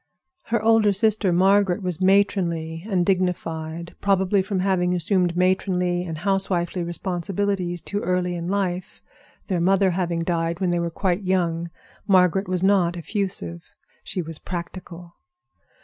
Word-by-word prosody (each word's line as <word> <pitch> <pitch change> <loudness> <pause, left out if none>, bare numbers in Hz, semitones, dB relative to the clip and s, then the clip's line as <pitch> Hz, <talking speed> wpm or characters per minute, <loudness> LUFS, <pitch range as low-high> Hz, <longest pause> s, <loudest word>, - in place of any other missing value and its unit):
Her 235 0 0
older 220 -2 +4
sister, 210 -1 +2
Margaret, 195 +2 +3
was 180 -1 -2
matronly 175 -4 +1
and 180 -3 +1
dignified, 170 -3 -2
probably 195 0 +2
from 190 -1 -2
having 180 -2 +1
assumed 175 0 +1
matronly 180 -1 +1
and 165 -3 -5
housewifely 185 -1 -1
responsibilities 175 +1 -2
too 205 - -2
early 180 -1 -1
in 170 -1 -4
life, 185 -2 -2 0.4
their 180 -4 -1
mother 190 +1 +3
having 170 -2 -1
died 165 0 -1
when 185 -2 0
they 175 - +1
were 170 0 -1
quite 180 +2 -1
young. 170 -3 0 0.4
Margaret 190 0 +3
was 185 0 -1
not 185 -3 +3
effusive; 170 - -3 0.3
she 180 - -4
was 160 -1 -5
practical. 175 -1 -7
180 Hz, 135 wpm, -23 LUFS, 170-195 Hz, 0.4 s, older